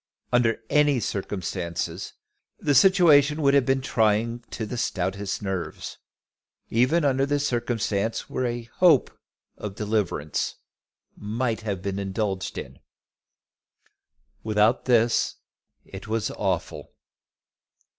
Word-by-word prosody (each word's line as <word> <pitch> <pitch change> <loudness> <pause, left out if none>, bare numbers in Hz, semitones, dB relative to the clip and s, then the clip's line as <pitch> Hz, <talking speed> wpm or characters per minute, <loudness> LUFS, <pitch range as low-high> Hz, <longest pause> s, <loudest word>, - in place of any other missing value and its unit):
Under 120 -2 +3
any 145 -1 +3
circumstances 90 -4 -4 0.4
the 145 - 0
situation 150 -3 +5
would 140 0 +4
have 140 -3 +3
been 135 0 +2
trying 115 -1 +1
to 110 - -4
the 115 - -5
stoutest 100 -3 -2
nerves, 95 -3 -5 0.7
even 135 +8 +2
under 140 +1 +2
circumstances 115 -5 -1
where 130 - -2
a 120 0 -3
hope 170 -8 +5 0.5
of 100 -2 -6
deliverance 105 -8 -1 0.6
might 115 +2 -2
have 100 -4 -4
been 100 0 -2
indulged 95 -1 -3
in. - - -8 1.6
Without 110 +2 +2
this 120 -2 +2 0.5
it 95 +1 -10
was 110 -1 -1
awful. - - -3
115 Hz, 105 wpm, -25 LUFS, 100-135 Hz, 1.6 s, situation